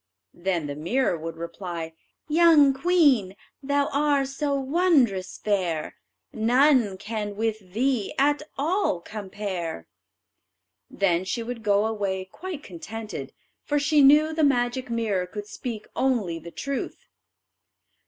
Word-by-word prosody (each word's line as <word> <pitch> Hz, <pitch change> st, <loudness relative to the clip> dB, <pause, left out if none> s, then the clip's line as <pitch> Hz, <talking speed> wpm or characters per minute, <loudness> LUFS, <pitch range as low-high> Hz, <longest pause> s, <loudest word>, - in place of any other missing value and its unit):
Then 175 Hz, -3 st, -2 dB
the 145 Hz, -, -4 dB
mirror 175 Hz, -, 0 dB
would 165 Hz, 0 st, -6 dB
reply: 170 Hz, -1 st, -6 dB, 0.3 s
"Young 310 Hz, -3 st, +6 dB
queen, 275 Hz, -, +3 dB, 0.3 s
thou 285 Hz, +1 st, +1 dB
are 285 Hz, -1 st, +2 dB
so 280 Hz, +1 st, -2 dB
wondrous 270 Hz, -, +2 dB
fair, 180 Hz, -7 st, -1 dB, 0.4 s
None 240 Hz, -2 st, +3 dB
can 210 Hz, 0 st, -4 dB
with 215 Hz, -4 st, -3 dB
thee 245 Hz, -2 st, 0 dB
at 290 Hz, +2 st, +3 dB, 0.2 s
all 320 Hz, -, +1 dB
compare." 190 Hz, -, -5 dB, 1.0 s
Then 180 Hz, -3 st, +1 dB
she 210 Hz, +5 st, -3 dB
would 235 Hz, 0 st, -6 dB
go 205 Hz, -1 st, +2 dB
away 200 Hz, -4 st, -2 dB
quite 315 Hz, -, -8 dB
contented, 215 Hz, +5 st, -7 dB, 0.3 s
for 295 Hz, -, 0 dB
she 290 Hz, +1 st, +3 dB
knew 300 Hz, +3 st, +6 dB
the 315 Hz, 0 st, +1 dB
magic 250 Hz, -2 st, +1 dB
mirror 215 Hz, -6 st, -1 dB
could 205 Hz, +2 st, -7 dB
speak 220 Hz, +1 st, -6 dB
only 215 Hz, -11 st, 0 dB
the 170 Hz, -, -10 dB
truth. 275 Hz, +9 st, -5 dB
225 Hz, 125 wpm, -25 LUFS, 190-280 Hz, 1.0 s, Young